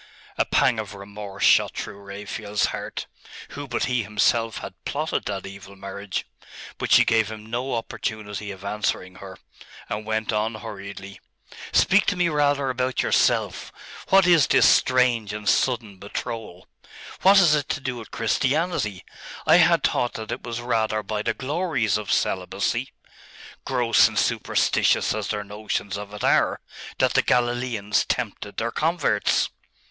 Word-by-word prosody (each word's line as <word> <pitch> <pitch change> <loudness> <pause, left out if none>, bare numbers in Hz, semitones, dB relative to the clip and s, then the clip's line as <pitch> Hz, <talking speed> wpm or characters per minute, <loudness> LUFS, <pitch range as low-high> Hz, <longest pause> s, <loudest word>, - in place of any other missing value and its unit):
A - - +1
pang 120 -4 +2
of 105 -1 -6
remorse 100 0 -8
shot - - +4
through 100 -2 -6
Raphael's 100 +1 -3
heart. - - -5 0.4
Who 145 0 -7
but 120 - -2
he 125 -2 0
himself 110 +2 +1
had - - -7
plotted 155 +3 -2
that 100 -2 -4
evil 100 0 -10
marriage? 100 0 -5 0.5
But - - -3
she - - +7
gave 110 -1 +2
him 110 -1 -9
no 125 +2 -2
opportunity 105 -2 -4
of 95 0 -9
answering 100 -3 -2
her, 95 -1 -10 0.5
and 105 +1 -4
went 110 0 -2
on 110 +1 0
hurriedly 100 -3 -8 0.5
'Speak 195 +1 +4
to 200 - +2
me 175 -1 +2
rather 145 -3 +1
about 125 0 -1
yourself. - - +1 0.4
What 195 -1 +6
is 170 -5 +5
this - - +5
strange 125 -5 +3
and 105 -1 -6
sudden 115 -7 +1
betrothal? 100 -2 -6 0.5
What 195 +2 +7
has 175 -6 +6
it 150 -2 0
to - - -1
do 130 -3 -4
with 115 - -9
Christianity? 130 - -1 0.4
I - - +7
had - - +4
thought 120 - +1
that 110 0 -6
it 120 - -4
was 120 0 -5
rather 110 -3 0
by 105 +1 -3
the - - -1
glories 135 - 0
of 105 - -5
celibacy - - -1 0.7
gross 120 -3 +4
and - - -6
superstitious - - +2
as - - -3
their 105 - -2
notions 100 -1 -4
of 100 0 -7
it 105 0 -7
are - - +3 0.4
that - - +2
the - - +4
Galileans 120 -4 +1
tempted 105 -4 -3
their 115 +1 -1
converts. 150 -8 +1
110 Hz, 155 wpm, -24 LUFS, 105-125 Hz, 0.7 s, she